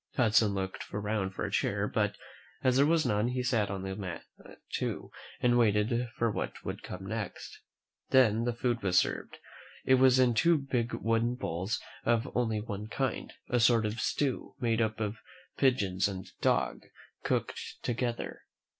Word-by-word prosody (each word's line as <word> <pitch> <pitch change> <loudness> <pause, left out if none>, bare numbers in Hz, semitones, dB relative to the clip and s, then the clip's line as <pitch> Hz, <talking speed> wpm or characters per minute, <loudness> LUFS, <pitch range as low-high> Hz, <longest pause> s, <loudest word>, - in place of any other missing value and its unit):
Hudson 110 -4 +4
looked 95 -1 -4
around 105 -2 -2
for - - -2
a - - -4
chair; - - 0
but, - - 0 0.5
as 130 -1 +3
there 140 +2 +5
was 165 0 +3
none, 105 +2 +2
he 125 0 -1
sat 120 -5 +1
down 95 -1 -4
on 95 - -3
a - - -4
mat 90 -5 -5 0.5
too, - - -3 0.3
and 120 0 +3
waited 115 +2 +2
for 115 -1 +2
what - - -5
would - - -4
come 95 +1 -7
next. 105 0 -5 0.5
Then 115 -4 +5
the 120 - 0
food 120 -1 0
was 95 -2 +2
served. - - 0 0.5
It 130 - +5
was 130 -1 +6
in 125 -2 +4
two 170 +9 +4
big 130 -4 -1
wooden 115 +2 +1
bowls 95 -1 -2 0.2
and 120 - +4
of - - -10
only 115 -3 +1
one 105 -1 -5
kind 130 +4 -2
— - - -45
a 125 - +1
sort 115 -1 +4
of 110 +2 -2
stew, 140 -3 -1
made 115 -2 +1
up 110 0 0
of 105 0 -2 0.4
pigeons 100 -8 +2
and 95 -2 -5 0.2
dog - - +1 0.4
cooked - - -1 0.2
together. 120 0 -2
115 Hz, 175 wpm, -30 LUFS, 105-125 Hz, 0.5 s, was